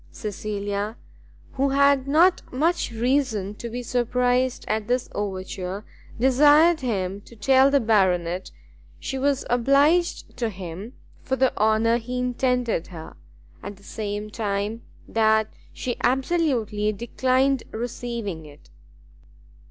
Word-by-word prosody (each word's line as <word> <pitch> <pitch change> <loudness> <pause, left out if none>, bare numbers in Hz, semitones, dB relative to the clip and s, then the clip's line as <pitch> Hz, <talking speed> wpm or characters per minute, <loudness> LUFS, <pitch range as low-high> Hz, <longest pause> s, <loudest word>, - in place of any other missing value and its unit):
Cecilia, 205 0 -4 0.5
who 275 +1 0
had 280 -1 +3
not 335 +6 +4
much 325 +7 0
reason 230 -4 0
to 235 +3 -7
be 245 +2 -5
surprised 250 +1 0
at 215 -1 -1
this 245 +1 0
overture, 190 0 -4 0.3
desired 295 +6 +5
him 200 -6 -2
to 235 - -16
tell 265 +5 +4
the 280 0 +3
Baronet, 185 -6 +1 0.5
she 265 - -4
was 280 0 0
obliged 280 +8 +2
to 235 -2 -1
him 190 +3 -8 0.3
for 265 - -1
the 260 0 +1
honour 220 +2 +3
he 250 +2 -5
intended 250 -5 0
her, 160 -3 -10 0.5
at 205 - -7
the 200 - -21
same 210 0 -5
time 210 +1 -2 0.3
that 220 -1 +2 0.2
she 245 -2 -4
absolutely 250 -6 +1
declined 255 +4 +1
receiving 230 -6 -5
it. 145 0 -17
235 Hz, 120 wpm, -24 LUFS, 205-265 Hz, 0.5 s, desired